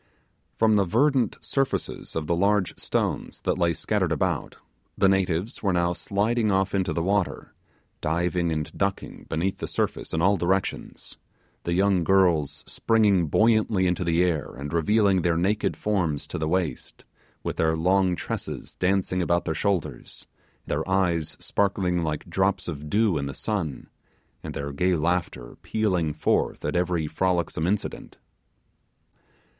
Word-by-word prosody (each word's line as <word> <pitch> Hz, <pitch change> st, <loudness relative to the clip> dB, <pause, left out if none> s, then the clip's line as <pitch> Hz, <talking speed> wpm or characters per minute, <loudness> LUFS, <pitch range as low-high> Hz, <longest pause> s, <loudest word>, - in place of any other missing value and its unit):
From 110 Hz, -1 st, +3 dB
the 100 Hz, -, +4 dB
verdant 125 Hz, -, +2 dB
surfaces 135 Hz, -1 st, -2 dB
of 80 Hz, -, -2 dB
the 85 Hz, -, +1 dB
large 100 Hz, +1 st, +2 dB
stones -, -, -2 dB
that -, -, -1 dB
lay 85 Hz, -1 st, +3 dB
scattered 80 Hz, -, -1 dB
about, -, -, -1 dB, 0.4 s
the 95 Hz, -, +4 dB
natives 95 Hz, +3 st, 0 dB
were 100 Hz, -3 st, +1 dB
now 85 Hz, 0 st, +1 dB
sliding 105 Hz, +5 st, 0 dB
off 95 Hz, 0 st, +1 dB
into 95 Hz, -3 st, 0 dB
the 80 Hz, +1 st, -1 dB
water, 100 Hz, 0 st, -1 dB, 0.5 s
diving 85 Hz, +2 st, 0 dB
and 75 Hz, -2 st, -3 dB
ducking -, -, -3 dB
beneath 85 Hz, +4 st, -1 dB
the -, -, -4 dB
surface -, -, -2 dB
in 80 Hz, -, -1 dB
all 100 Hz, +4 st, +3 dB
directions 95 Hz, +2 st, -2 dB, 0.5 s
the 85 Hz, -, 0 dB
young 95 Hz, -1 st, +3 dB
girls 80 Hz, -6 st, +2 dB
springing 105 Hz, -6 st, +2 dB
buoyantly 110 Hz, +1 st, +3 dB
into 90 Hz, +1 st, 0 dB
the 85 Hz, 0 st, +2 dB
air, 80 Hz, -5 st, -1 dB
and 70 Hz, +3 st, -6 dB
revealing 100 Hz, +3 st, +3 dB
their 85 Hz, -1 st, +1 dB
naked 100 Hz, +5 st, 0 dB
forms 90 Hz, -9 st, -1 dB
to -, -, -5 dB
the 80 Hz, -, -1 dB
waist, 90 Hz, -3 st, -2 dB, 0.4 s
with -, -, -3 dB
their 80 Hz, 0 st, +2 dB
long 90 Hz, +2 st, +2 dB
tresses -, -, -5 dB
dancing 90 Hz, 0 st, 0 dB
about 85 Hz, 0 st, +1 dB
their 80 Hz, -, -1 dB
shoulders, 95 Hz, +3 st, -2 dB, 0.4 s
their 80 Hz, +5 st, -2 dB
eyes 90 Hz, -4 st, +1 dB
sparkling 95 Hz, -3 st, 0 dB
like 75 Hz, 0 st, -3 dB
drops 95 Hz, +3 st, 0 dB
of 75 Hz, -3 st, -6 dB
dew 105 Hz, -4 st, +2 dB
in 70 Hz, -, -3 dB
the 70 Hz, -, -6 dB
sun, 95 Hz, -11 st, -3 dB, 0.6 s
and -, -, -6 dB
their 70 Hz, 0 st, -4 dB
gay 90 Hz, +6 st, +1 dB
laughter 85 Hz, -6 st, -2 dB
pealing 90 Hz, -8 st, 0 dB
forth 75 Hz, -, 0 dB
at -, -, -1 dB
every 90 Hz, -2 st, +1 dB
frolicsome 85 Hz, 0 st, 0 dB
incident. 100 Hz, +2 st, -3 dB
90 Hz, 150 wpm, -25 LUFS, 80-100 Hz, 0.6 s, the